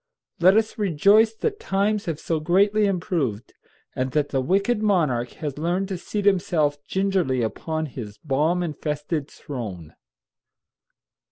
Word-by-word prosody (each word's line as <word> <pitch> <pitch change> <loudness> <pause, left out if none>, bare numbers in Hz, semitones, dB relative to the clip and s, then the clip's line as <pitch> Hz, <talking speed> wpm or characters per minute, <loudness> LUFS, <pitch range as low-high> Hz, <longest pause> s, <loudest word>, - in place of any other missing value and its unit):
Let 185 +4 +6
us 220 0 0
rejoice 205 +4 +4
that 420 - -2
times 205 +2 0
have 160 -4 -3
so 165 -2 -1
greatly 200 +6 +3
improved, 165 - -2 0.4
and 130 0 -2
that 150 -1 +1
the 135 - 0
wicked 200 - +1
monarch 150 - +1
has 150 -3 -5
learned 180 +4 -1
to 190 - -3
seat 205 +2 -4
himself 155 -7 +2
gingerly 190 -10 0
upon 160 +8 -3
his 115 -7 -8
bomb 155 +5 0
infested 150 -1 -3
throne. 105 - -7
165 Hz, 135 wpm, -24 LUFS, 145-195 Hz, 0.4 s, Let